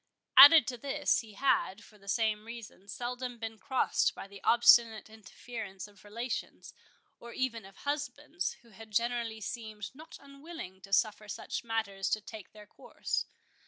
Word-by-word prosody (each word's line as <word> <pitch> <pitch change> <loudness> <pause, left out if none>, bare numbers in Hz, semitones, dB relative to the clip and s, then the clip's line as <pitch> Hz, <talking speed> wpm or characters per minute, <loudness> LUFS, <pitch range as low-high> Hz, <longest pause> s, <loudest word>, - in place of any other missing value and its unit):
Added 290 +4 +11
to 245 - -5
this, 275 +3 +1
he 220 -2 -10
had, 225 -3 +1
for 210 - -19
the 200 - -20
same 215 0 0
reason, 225 -4 -10
seldom 245 +3 -5
been 225 -1 -6
crossed 265 -2 +1
by - - -8
the 200 0 -13
obstinate 230 -2 +5
interference 215 -2 -9
of 205 -2 -20
relations, 230 +4 -6 0.5
or 235 0 -10
even 235 -5 -2
of 195 0 -15
husbands, 290 - -3
who 235 - -20
had 220 +2 -13
generally 230 0 -1
seemed 215 -2 -6
not 310 +4 -12
unwilling 275 - -10
to 195 - -14
suffer 210 +1 +1
such - - -5
matters 220 -4 -2
to 215 - +1
take 215 -1 -11
their 210 -1 -14
course. - - -4
225 Hz, 160 wpm, -31 LUFS, 210-250 Hz, 0.5 s, Added